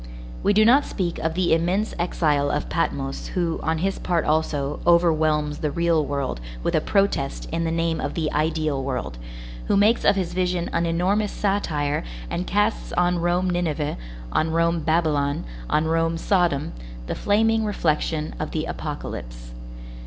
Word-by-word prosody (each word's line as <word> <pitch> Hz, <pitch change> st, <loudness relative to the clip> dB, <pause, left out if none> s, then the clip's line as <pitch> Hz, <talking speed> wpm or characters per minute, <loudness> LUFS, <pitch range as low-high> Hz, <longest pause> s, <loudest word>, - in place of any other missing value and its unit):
We -, -, +3 dB
do 215 Hz, +1 st, +5 dB
not 265 Hz, +5 st, +6 dB
speak 180 Hz, -9 st, -3 dB
of 160 Hz, 0 st, -1 dB
the 180 Hz, -2 st, +2 dB
immense 180 Hz, +6 st, +1 dB
exile 150 Hz, -5 st, +1 dB
of 145 Hz, -, -2 dB
Patmos 135 Hz, -5 st, -2 dB
who, 170 Hz, -3 st, 0 dB
on 160 Hz, 0 st, 0 dB
his 195 Hz, +4 st, -1 dB
part 175 Hz, -3 st, 0 dB
also, 150 Hz, -2 st, 0 dB
overwhelms 155 Hz, -3 st, +3 dB
the 150 Hz, -, -1 dB
real 170 Hz, 0 st, +2 dB
world 140 Hz, -, -3 dB, 0.2 s
with -, -, 0 dB
a -, -, +3 dB
protest 195 Hz, -9 st, 0 dB
in 165 Hz, +1 st, -1 dB
the 165 Hz, -, 0 dB
name 165 Hz, 0 st, 0 dB
of -, -, -3 dB
the 160 Hz, -3 st, -1 dB
ideal 155 Hz, -2 st, 0 dB
world, 125 Hz, -, -4 dB, 0.5 s
who -, -, +3 dB
makes 215 Hz, +4 st, +4 dB
of -, -, +5 dB
his 185 Hz, -3 st, -2 dB
vision 180 Hz, -1 st, -1 dB
an 170 Hz, -, +1 dB
enormous 190 Hz, +5 st, +1 dB
satire 155 Hz, -8 st, -1 dB, 0.3 s
and 180 Hz, +1 st, -2 dB
casts 205 Hz, +3 st, 0 dB
on 175 Hz, 0 st, +2 dB
Rome 175 Hz, +2 st, +1 dB
Nineveh, 160 Hz, -4 st, -1 dB, 0.4 s
on 160 Hz, -, +1 dB
Rome 165 Hz, +1 st, +2 dB
Babylon, 155 Hz, -3 st, +1 dB, 0.3 s
on 155 Hz, -, +2 dB
Rome 165 Hz, +1 st, +1 dB
Sodom, 170 Hz, -5 st, +1 dB, 0.3 s
the -, -, -3 dB
flaming 220 Hz, +2 st, +2 dB
reflection 160 Hz, -6 st, -1 dB
of 155 Hz, -, -3 dB
the 155 Hz, 0 st, -2 dB
Apocalypse. -, -, -6 dB
165 Hz, 160 wpm, -24 LUFS, 150-180 Hz, 0.5 s, not